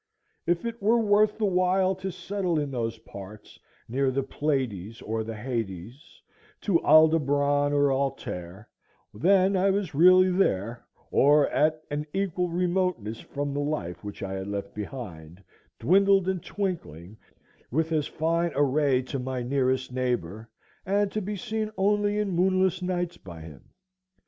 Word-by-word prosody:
If 175 +4 +1
it 230 -1 -5
were 220 +4 +4
worth 210 -1 +3
the 220 - 0
while 185 0 +2
to 190 0 -4
settle 180 -1 -2
in 145 -2 -3
those 115 -3 -3
parts 105 -1 -12 0.3
near 135 +4 0
to - - +2
the 135 +1 -1
Pleiades 125 - -2
or 110 +1 -3
the 110 0 -6
Hyades, 115 - -6 0.4
to 185 -5 +2
Aldebaran 145 -2 +4
or 145 -1 +3
Altair, 105 -8 -4 0.5
then 190 - +3
I 190 +1 +3
was 195 -5 -1
really 185 +4 +6
there, 120 - 0 0.3
or 145 +1 +5
at 155 +1 +1
an 150 +1 -3
equal 180 -2 -1
remoteness 175 - -1
from 145 0 -4
the 145 - -2
life 105 - -3
which 105 0 -7
I 95 0 -4
had 95 0 -5
left 100 -1 -5
behind, 100 - -8 0.3
dwindled 195 +1 +4
and 190 -2 -1
twinkling 110 - -5 0.5
with 160 +5 0
as 155 -2 +1
fine 165 +2 0
a 145 - +3
ray 140 -2 +2
to 130 +1 -4
my 130 -1 -3
nearest 130 0 0
neighbor, 115 -4 -2 0.3
and 200 +1 +1
to 215 - -2
be 205 +2 -4
seen 215 +2 -3
only 205 +1 +2
in 210 -2 -1
moonless 185 +1 +2
nights 180 -1 -2
by 85 -3 -11
him. 75 -5 -13
145 Hz, 155 wpm, -26 LUFS, 115-185 Hz, 0.5 s, really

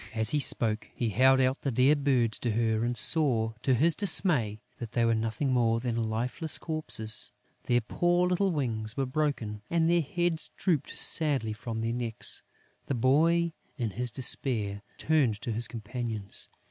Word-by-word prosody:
As 110 +1 +2
he 150 - +1
spoke, 110 -5 +1
he 120 - -1
held 130 +5 +4
out 130 +1 +1
the 140 - -1
dear 130 +4 +4
birds 130 -6 +1
to 120 -3 -1
her 110 0 +1
and 120 0 -1
saw, 115 -5 +2
to 130 0 +2
his 160 +7 +3
dismay, 155 - +3 0.2
that 115 -3 -7
they 120 -1 +2
were 115 - +3
nothing 115 +5 -1
more 115 -2 +2
than 115 -2 -2
lifeless 125 +8 +1
corpses: 130 -9 -2 0.4
their 120 0 +3
poor 175 +9 +1
little 185 +2 +1
wings 115 -7 -3
were 135 - 0
broken 130 -7 -2
and 165 -1 +2
their 170 0 +3
heads 170 +2 0
drooped 165 -8 -1
sadly 140 -9 +1
from 110 +1 -5
their 115 +1 -1
necks! 120 -2 -3 0.5
The 140 - -1
boy, 160 +7 +2 0.2
in 115 -5 -2
his 125 +5 -2
despair, 110 -4 -1 0.2
turned 140 -10 +1
to 120 - -4
his 115 +2 -2
companions. 110 -2 -5
125 Hz, 170 wpm, -28 LUFS, 110-150 Hz, 0.5 s, held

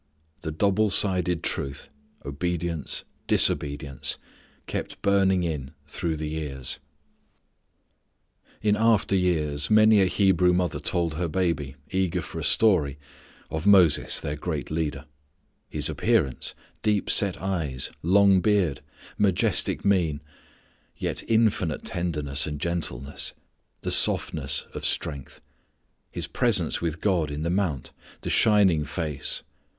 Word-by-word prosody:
The - - -4
double 100 +6 +1
sided 90 -3 +1
truth 70 0 -4 0.4
obedience 85 +2 -3 0.2
disobedience 70 -2 0 0.5
kept - - -5
burning 95 -2 +2
in 75 -4 -4
through 80 +2 -3
the 75 0 -4
years. 75 -4 -3 1.8
In 105 -1 +3
after 110 -2 +2
years 75 -6 +1
many 110 -1 +5
a 95 - +3
Hebrew 90 -2 +3
mother 90 -3 -1
told 85 -2 -1
her 85 +3 -2
baby, 80 -6 -2 0.2
eager 90 -2 -1
for - - -7
a - - -5
story, 80 -11 +2 0.5
of 80 +4 -3
Moses 90 -7 +5
their 75 - -4
great 75 -2 -5
leader; 75 -3 -3 0.6
his - - 0
appearance, 65 - 0 0.3
deep 105 -2 0
set 100 -3 +4
eyes, 80 -9 -1
long 100 +2 +4
beard, 95 -8 +1 0.4
majestic 100 -4 +1
mien, 85 -7 +1 0.8
yet - - -2
infinite 110 -8 +1
tenderness 75 -6 -2
and 75 -1 -5
gentleness, 75 -5 -3 0.5
the - - -2
softness - - +4
of - - -7
strength; 70 -3 -4 0.7
his - - -3
presence 100 -9 +1
with 80 -1 -3
God 90 -7 +1
in 75 +1 -5
the 85 - -1
mount, 90 -8 -2 0.3
the - - -4
shining 100 -8 +4
face. 75 -2 -1
85 Hz, 120 wpm, -25 LUFS, 75-95 Hz, 1.8 s, many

